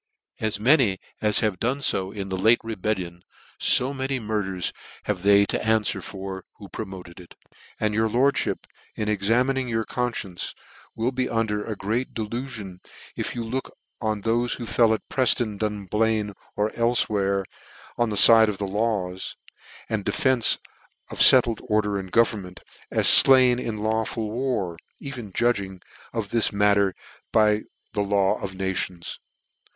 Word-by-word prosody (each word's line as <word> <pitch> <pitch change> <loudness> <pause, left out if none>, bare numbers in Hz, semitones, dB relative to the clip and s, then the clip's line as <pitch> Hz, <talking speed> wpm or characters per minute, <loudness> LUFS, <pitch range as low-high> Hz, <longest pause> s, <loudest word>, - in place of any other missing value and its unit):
'* - - -67
As 110 -1 -2
many 120 -4 +4 0.2
as 105 -1 +3
have 105 -4 0
fo 125 +3 +1
done 95 -9 0
in 100 -1 -4
the 95 - -2
late 110 +6 +4
rebel 110 -1 -2
lion^ 90 -2 -8 0.4
fo 130 +3 +3
many 135 0 -2
murders 105 -6 -2 0.3
have 100 -4 -2
they 100 +1 +5
to - - -2
anfwer 110 -1 0
for 95 -1 -7
who 100 - -11
promoted 95 -4 -8
it; 90 - -14 0.4
and 105 -1 0
your 110 +1 +1
lordihip, 130 +5 +1 0.3
in 105 - -3
examining 120 +6 +1
your 115 -1 -1
cpnfcience, 120 -7 -4 0.4
will 115 +3 -1
be 130 -1 -2
under 110 -2 -1
a 110 - -5
great 110 +6 -3
delufion, 110 -4 -5 0.4
if - - -4
you 120 - -3
look 125 +4 -5 0.2
on 110 -3 -2
thofe 120 +2 0
who 120 - -6
fell 115 -1 +3
'at 110 - -2
Prefton, 120 -5 +1
Dum 105 -2 -3
lain, 110 -1 +1 0.2
or 105 +1 0
elfewhere, 105 -5 +1 0.5
on 120 -1 0
the 105 - -3
fide 110 +1 +8
of 100 - -4
the 100 - -3
laws, 100 -3 -2 0.5
and 110 -3 -2
defence 130 -4 +2 0.5
of - - -8
fettled 120 -3 +7
order 105 -3 0
and 95 -1 -8
government, 105 -6 0 0.3
as - - 0
fluin 130 -2 +6
in 110 -2 -4
lawful 110 0 -2
war, 110 -9 -2 0.2
even 125 -7 -7
judging 100 -5 0 0.3
of 110 -4 -4
this 115 -3 +2
matter 100 -1 +2 0.4
by 105 -1 +3 0.3
the 105 - 0
law 100 -1 +1
of 95 -1 -5
nations. 95 -2 -3
110 Hz, 155 wpm, -24 LUFS, 100-120 Hz, 0.5 s, fide